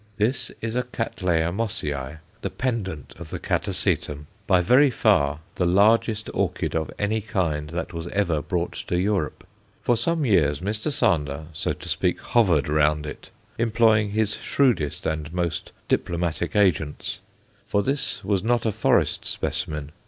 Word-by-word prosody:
This 115 +5 0
is 115 0 -3
a 125 - +2
Cattleya 90 -9 -1
Mossiæ, 75 - -2 0.2
the - - -2
pendant 105 - -3
of 85 -2 -8
the - - -4
Catasetum, 75 0 -1 0.2
by 90 - +5
very 125 +11 +5
far 70 - +2 0.2
the 90 - +2
largest 105 +4 +3
orchid - - -1
of 80 -1 -1
any 110 +2 0
kind 85 -9 -1
that 85 +2 -4
was 85 0 -5
ever 85 -5 0
brought - - -2 0.2
to 90 - +1
Europe. 95 -6 -1 0.4
For 120 - +3
some 155 +7 0
years 75 - +3
Mr. 105 - -2
Sander, 75 - +1
so 75 - -1
to - - -10
speak, - - 0
hovered 90 - +2
round 75 0 +2
it, 75 - -8 0.3
employing 110 -2 +3
his 105 0 0
shrewdest 120 - +1
and 80 -1 -2
most 85 -2 -2 0.2
diplomatic 85 0 -1
agents. 85 -8 +1 0.5
For 100 - +1
this 130 -3 -2
was 100 -2 +1
not 120 +1 +1
a 110 - +2
forest 105 - +2
specimen. 75 -1 -2
95 Hz, 150 wpm, -24 LUFS, 75-110 Hz, 0.5 s, by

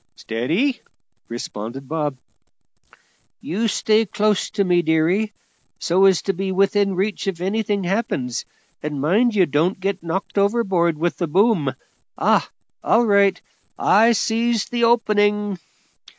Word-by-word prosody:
"Steady!" 170 - -1 0.5
responded 120 +2 -7
Bob. 150 -3 -2 1.2
"You 220 +7 -2
stay 220 +1 +2
close 210 0 0
to 205 - 0
me, 180 -2 +2
dearie, 170 +7 +1 0.5
so's 190 +1 +3
to 195 - -1
be 190 +1 -3
within 195 +1 +1
reach 195 +2 -2
if 185 -3 -2
anything 200 +1 -1
happens, 175 - -2 0.4
and 150 -1 -4
mind 215 - +2
you 190 -3 +4
don't 165 +6 0
get 195 0 -2
knocked 180 +4 -3
overboard 195 -6 +1
with 170 +2 -1
the 175 - -2
boom. 180 - +2 0.4
Ah! - - +2 0.3
all 235 +1 +3
right; 200 -3 +3 0.4
I 225 +4 +4
sees 230 0 0
the 240 -1 +1
opening." 210 -4 +1
195 Hz, 125 wpm, -21 LUFS, 165-215 Hz, 1.2 s, you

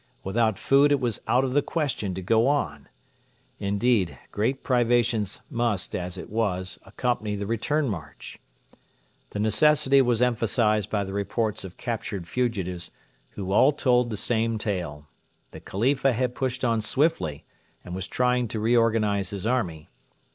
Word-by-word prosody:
Without 110 +1 +1
food 140 +2 +4
it 145 - +3
was 120 -4 -2
out 125 +2 +3
of 130 -1 -1
the 145 - +4
question 135 - -2
to 95 - -5
go 115 +6 +3
on. 145 +1 -1 0.7
Indeed, 100 -1 +1
great 125 +6 -1
privations 120 -4 +1
must, 115 -5 -1
as 90 0 -4
it - - -7
was, 95 -4 -1
accompany 110 -4 -2
the 100 0 -4
return 135 +7 0
march. 80 - -7 0.9
The - - -6
necessity 140 +6 +4
was 120 -3 +2
emphasised 115 -3 +1
by 105 -2 0
the 95 0 -6
reports 105 +2 -1
of 95 -1 -9
captured 110 -6 -4
fugitives, 95 -9 -2 0.4
who 95 -2 -5
all 130 +8 +5
told 125 -4 +2
the 110 - -4
same 115 +1 0
tale. 90 -9 -4 0.5
The - - -9
Khalifa 135 +6 +1
had 125 +1 -1
pushed 130 -1 -2
on 115 -2 +1
swiftly, 130 - 0 0.4
and 90 - -7
was 95 +1 -4
trying 125 -1 +1
to 110 - -4
reorganise 110 -4 +2
his 100 0 -5
army. 95 -11 -1
115 Hz, 150 wpm, -26 LUFS, 100-125 Hz, 0.9 s, all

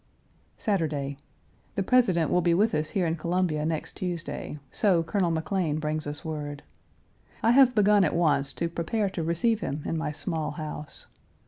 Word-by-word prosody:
Saturday. 150 -9 -1 0.6
The 195 - 0
President 185 -9 +3
will 180 - +3
be 170 0 +3
with 215 +5 +3
us 155 0 0
here 190 -4 0
in 165 0 0
Columbia 170 -2 0
next 160 -1 -3
Tuesday, 175 -4 -4
so 180 -5 +3
Colonel 175 +2 0
McLean 165 -1 0
brings 155 0 -2
us 145 +2 -5
word. 145 -2 -5 0.8
I 230 - +5
have 255 -1 +6
begun 205 -1 +5
at 160 - +1
once 150 -5 +2
to 170 - -1
prepare 190 +5 -1
to 175 - -3
receive 170 +8 +1
him 145 -7 -4
in 165 - -1
my 155 - -2
small 160 0 -3
house. 150 -1 -7
165 Hz, 165 wpm, -27 LUFS, 155-195 Hz, 0.8 s, have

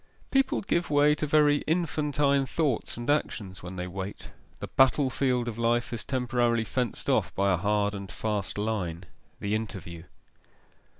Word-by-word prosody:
People 270 0 +2
give 175 -3 0
way 145 0 +5
to 150 +1 -2
very 150 -1 +4
infantine 150 -4 +1
thoughts 145 -9 -1
and 120 - -6
actions 105 -9 -1
when 90 +1 -7
they 90 0 -3
wait; 95 +2 -6 0.3
the - - -4
battle 135 0 +3
field 125 -3 0
of 115 -1 -4
life 120 +1 +1
is 115 - -4
temporarily 120 -3 +1
fenced 120 0 -3
off - - +2
by 100 0 +2
a - - +2
hard 105 +2 +1
and 100 -2 -6
fast 105 -3 -2
line 95 -5 -2 0.4
the 100 +1 -2
interview. 95 -6 -4
120 Hz, 160 wpm, -28 LUFS, 100-145 Hz, 0.4 s, way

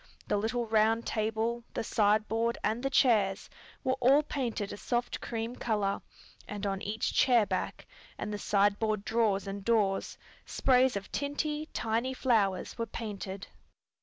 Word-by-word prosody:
The - - +1
little 230 +3 -1
round 225 +1 +2
table, 225 +2 -1
the - - -1
sideboard 220 +2 +1
and 220 +3 0
the 270 - 0
chairs 210 -8 +2 0.3
were 260 - +2
all 270 +4 +5
painted 240 -8 -3
a - - -7
soft 240 +2 -2
cream 230 +1 -4
color, 210 -5 -1 0.5
and 210 0 -5
on 195 -1 -1
each 215 +2 -2
chair 240 -4 +5
back, - - -3 0.3
and 210 - -4
the 205 - -3
sideboard 205 +1 +1
drawers 220 -3 +1
and 195 0 -5
doors 205 -3 +1 0.3
sprays 255 -1 +3
of 200 -1 -5
tinty, 295 +2 -2
tiny 230 +4 -1
flowers 215 -7 +1
were 230 - -1
painted. 200 -3 -6
220 Hz, 145 wpm, -30 LUFS, 205-240 Hz, 0.5 s, all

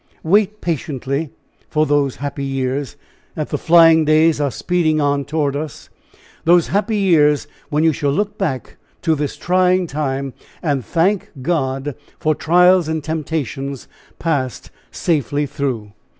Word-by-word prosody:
Wait 210 +4 +2
patiently 145 -2 -2 0.4
for 155 0 +2
those 145 -3 +1
happy 140 0 -5
years, 135 -1 -2 0.4
that - - -3
the - - -2
flying 165 -1 +6
days 155 0 +3
are 145 - +1
speeding 160 +1 0
on 145 -1 +1
toward 145 -1 -1
us 150 -2 -6 0.5
those 170 0 +4
happy 210 +2 0
years, 155 -7 +3 0.2
when 150 0 +1
you 160 -1 +4
shall 145 0 -1
look 205 +8 -1
back 145 - -3 0.3
to 165 - +3
this 150 -2 -3
trying 185 0 +2
time, 135 -3 -3 0.3
and 140 -6 0
thank 185 - 0
God 135 -3 -1 0.2
for 155 -1 +1
trials 180 +2 +4
and 160 -1 -2
temptations 145 -4 -4 0.3
passed 140 -7 -2 0.2
safely 145 -3 0
through. 130 -7 -3
155 Hz, 135 wpm, -19 LUFS, 140-170 Hz, 0.5 s, flying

